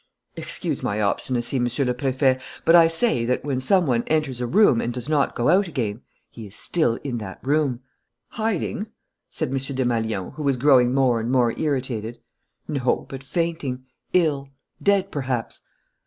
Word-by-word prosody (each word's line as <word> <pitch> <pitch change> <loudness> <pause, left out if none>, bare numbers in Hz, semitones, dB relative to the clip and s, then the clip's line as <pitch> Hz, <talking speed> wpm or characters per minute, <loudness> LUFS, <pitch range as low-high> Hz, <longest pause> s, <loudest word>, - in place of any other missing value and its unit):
"Excuse - - -3
my 100 +1 -1
obstinacy, 120 +5 -1
Monsieur 125 +3 0
le 125 - +1
Préfet, 130 0 +1 0.2
but 165 - +6
I 165 -1 +8
say 165 - +1
that, 125 +3 -1
when 135 -3 -1
some 180 +7 +3
one 120 -4 +2
enters 150 -6 0
a 120 - -1
room 180 - +4
and 120 - -2
does 125 +1 -5
not 150 -3 +1
go 120 - 0
out 190 +3 +4
again, 120 -8 -3 0.3
he 110 -2 -9
is 100 - -9
still 155 -9 +1
in 125 -4 -3
that 95 -3 -7
room." 140 -3 +1 0.5
"Hiding?" 215 -1 -2 0.4
said - - -3
M. 135 - 0
Desmalions, 120 -7 -2
who - - -5
was 140 -3 +1
growing 125 -2 +5
more 130 -3 +2
and 115 +2 -2
more 125 -3 +3
irritated. 125 -6 -2 0.5
"No, 130 -4 0
but 135 0 -7
fainting, 145 -5 -2 0.3
ill 150 -6 +1 0.3
dead, 200 -1 +2
perhaps." 130 -5 -3
130 Hz, 170 wpm, -23 LUFS, 120-150 Hz, 0.5 s, I